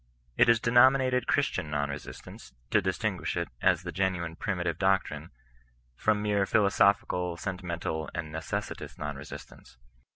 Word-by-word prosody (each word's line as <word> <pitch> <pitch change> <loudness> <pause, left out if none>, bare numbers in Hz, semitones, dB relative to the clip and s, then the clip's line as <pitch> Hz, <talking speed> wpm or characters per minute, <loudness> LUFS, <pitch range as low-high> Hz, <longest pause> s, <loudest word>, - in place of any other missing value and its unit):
It - - +5
is 115 -1 +5
denominated 125 +2 +4
Chris 145 - +3
tian 85 -5 -4
non 70 -1 -1
resistance, 70 -3 -10 0.2
to 105 - +4
distinguish 95 0 -2
it, 85 - -2
as - - +3
the - - -5
genuine 90 -3 -1
primitive 90 -3 -2
doctrine, 95 -1 0 0.7
from 105 - +1
mere 100 -2 +1
philosophical, 100 -4 +2
sentimental, 85 -4 -4
and 80 -3 -5
n^e^iVot^ 80 0 -5
non 75 -1 -4
resistance. 70 -3 -11
95 Hz, 135 wpm, -29 LUFS, 80-105 Hz, 0.7 s, It